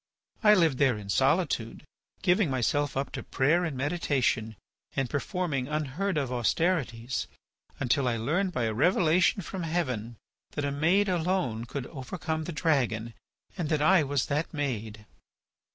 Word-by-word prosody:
I 210 -1 +7
lived 160 -8 +3
there 130 -5 +3
in 100 -2 -9
solitude, 135 - +1 0.4
giving 185 -1 +3
myself 135 +2 0
up 135 0 -2
to - - -5
prayer 155 +7 +2
and 155 -6 -3
meditation, 135 -7 0 0.4
and 135 - 0
performing 145 - -2
unheard 155 +5 -2
of 135 -4 -1
austerities, 125 -2 0 0.5
until 135 0 +1
I 120 -1 +1
learnt 170 - 0
by 125 - -1
a 110 -1 0
revelation 175 - +3
from 190 +2 -5
heaven 130 -10 -2 0.4
that 145 - -2
a 140 - -1
maid 170 +8 +2
alone 170 -10 0
could 125 +1 -5
overcome 160 +4 -4
the 175 - -4
dragon, 125 -8 0 0.4
and 170 -5 -3
that 150 -2 +1
I 185 +2 +6
was 140 -3 0
that 150 +3 -1
maid." 110 -7 -4
145 Hz, 150 wpm, -28 LUFS, 125-170 Hz, 0.5 s, I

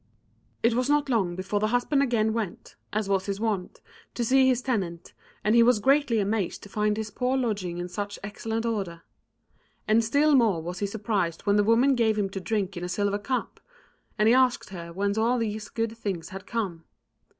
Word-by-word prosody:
It 230 +1 +4
was 250 +3 0
not 290 -1 +2
long 195 -8 +1
before 190 +3 -2
the 215 - +1
husband 245 +5 +1
again 225 -5 +1
went, 220 -6 -5 0.2
as 210 -1 -1
was 195 -1 0
his 200 0 -2
wont, 210 -5 -2 0.3
to 240 - -1
see 265 +2 +4
his 255 -1 +2
tenant, 180 -9 -3 0.3
and 215 - +2
he 235 - +6
was 240 0 +5
greatly 275 0 +3
amazed 205 -2 -1
to 205 - -11
find 210 0 0
his 220 -1 -4
poor 250 +5 0
lodging 205 -8 -2
in 175 0 -4
such 205 +3 -5
excellent 225 +3 -3
order. 195 -7 -3 0.8
And 220 +2 +4
still 285 +7 +3
more 225 -10 +4
was 175 +3 -6
he 205 - 0
surprised 200 -5 -2
when 200 -1 +2
the 205 - +4
woman 235 +6 +4
gave 225 -4 +2
him 195 -2 -1
to 195 - -4
drink 200 -1 -2
in 175 - -5
a 180 - -3
silver 200 +2 0
cup; 255 +5 -3 0.6
and 215 0 +3
he 230 - +6
asked 255 -5 +2
her 170 -3 -7
whence 200 +4 -1
all 235 +3 +2
these 215 -2 -3
good 225 0 -2
things 195 -7 -4
had 195 0 -9
come. 195 -8 -3
215 Hz, 205 wpm, -26 LUFS, 195-235 Hz, 0.8 s, he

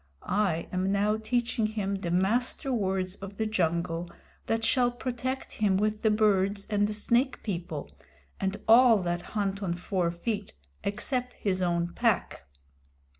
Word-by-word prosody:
"I 185 -4 0
am 185 +1 0
now 205 +2 +2
teaching 230 0 0
him 210 -2 -2
the 195 -3 -3
Master 230 +9 +1
Words 190 -4 0
of 195 0 -9
the 220 - 0
Jungle 170 -4 0 0.4
that 225 0 0
shall 245 -1 +3
protect 255 +2 -4
him 200 -3 +1
with 215 +1 0
the 220 - +3
birds 205 -2 +2
and 205 0 +3
the 210 - -3
Snake 235 +5 +1
People, 170 -7 -4 0.5
and 195 +1 -1
all 230 -3 +7
that 175 0 -1
hunt 200 -1 -2
on 175 -3 -1
four 180 0 -1
feet, 200 +4 -3 0.3
except 245 +4 -2
his 190 -2 -1
own 170 -1 +1
pack. 70 - 0
205 Hz, 150 wpm, -28 LUFS, 185-225 Hz, 0.5 s, all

